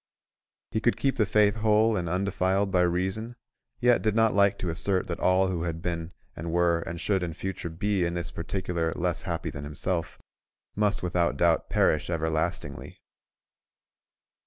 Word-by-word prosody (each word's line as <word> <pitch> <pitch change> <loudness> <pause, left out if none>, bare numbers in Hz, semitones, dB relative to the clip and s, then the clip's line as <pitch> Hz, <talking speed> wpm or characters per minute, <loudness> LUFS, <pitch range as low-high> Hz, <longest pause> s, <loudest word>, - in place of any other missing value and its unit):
He 110 - 0
could 120 - +2
keep 135 -1 0
the 110 -4 +2
faith 105 0 +3
whole 110 +1 +3
and 85 -4 -2
undefiled 95 +1 0
by 90 -2 +3
reason, 95 +7 -1 0.4
yet 120 -1 +4
did 110 -1 +1
not 115 -1 +4
like 100 0 +4
to 90 - -2
assert 90 +3 0
that 85 - -4
all 95 +1 +3
who 90 -3 -2
had 85 -1 -3
been 85 0 -3 0.2
and 85 +2 -5
were 85 0 +3
and 85 0 -6
should 95 +2 0
in 85 -3 -4
future 95 -2 -4
be 95 +3 0
in 85 0 -1
this 85 0 -4
particular 85 -1 -2
less 90 -1 -1
happy - - -3
than 70 - -7
himself, 80 +4 -3 0.6
must 105 -2 0
without 85 -5 +1
doubt 85 0 +2
perish 75 - +2
everlastingly. 80 -2 -2
90 Hz, 165 wpm, -27 LUFS, 85-100 Hz, 0.6 s, yet